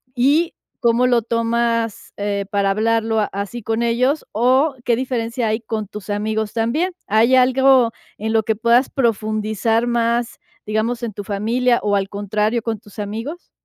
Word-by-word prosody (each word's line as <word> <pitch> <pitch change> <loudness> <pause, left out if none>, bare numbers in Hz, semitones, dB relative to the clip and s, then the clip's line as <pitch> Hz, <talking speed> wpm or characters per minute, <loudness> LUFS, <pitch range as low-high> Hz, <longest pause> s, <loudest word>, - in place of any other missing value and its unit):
y 290 +7 +2 0.3
cómo 235 +1 +3
lo 240 -2 +3
tomas, 230 -1 -1
eh, 200 -1 -2
para 200 -1 +1
hablarlo 225 +1 +1
a 210 - +2
así 200 +4 -4
con 225 +2 -1
ellos, 255 +6 +1
o 260 +6 +2
qué 240 -3 +2
diferencia 240 -2 -2
hay 220 +2 0
con 220 -2 -4
tus 210 0 -10
amigos 215 +1 -2
también? 255 +11 0
¿Hay 225 +5 +4
algo 260 -1 +4 0.3
en 220 +2 -2
lo 220 - +4
que 220 0 -1
puedas 235 +4 +3
profundizar 220 -1 0
más, 235 0 0 0.3
digamos, 225 +3 -1
en 220 -4 -3
tu 205 - -6
familia, 230 +5 +1
o, 205 -1 +1
al 195 0 0
contrario, 210 +3 -1
con 225 -3 -3
tus 205 -1 -18
amigos? 225 - -6
230 Hz, 165 wpm, -20 LUFS, 215-240 Hz, 0.3 s, Hay